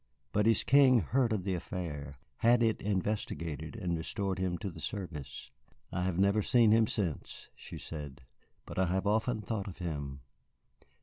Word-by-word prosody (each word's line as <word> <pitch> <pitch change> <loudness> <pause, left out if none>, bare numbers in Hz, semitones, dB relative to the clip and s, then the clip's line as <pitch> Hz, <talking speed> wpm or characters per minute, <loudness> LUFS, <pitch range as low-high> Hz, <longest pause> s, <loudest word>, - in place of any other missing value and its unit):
But 105 +1 +2
his 115 -2 +4
King 130 -1 +6
heard 120 - +1
of 105 -4 0
the 95 0 -1
affair, 75 -6 -5 0.2
had 120 +1 +4
it 110 -1 +1
investigated, 95 -6 -2
and 85 -1 -1
restored 95 +3 -2
him 90 -2 0
to 100 0 -4
the 80 - -11
service. 85 - -6 0.4
I 90 - -1
have 95 -2 -1
never 100 +2 +3
seen 115 +1 +4
him 110 0 +5
since," 90 -10 -3
she - - -9
said, 75 -5 -7 0.4
"but - - -5
I 95 - +3
have 95 +3 0
often 110 +2 +1
thought 105 -2 -3
of 95 - -7
him. 70 -6 -4
95 Hz, 170 wpm, -32 LUFS, 85-110 Hz, 0.4 s, King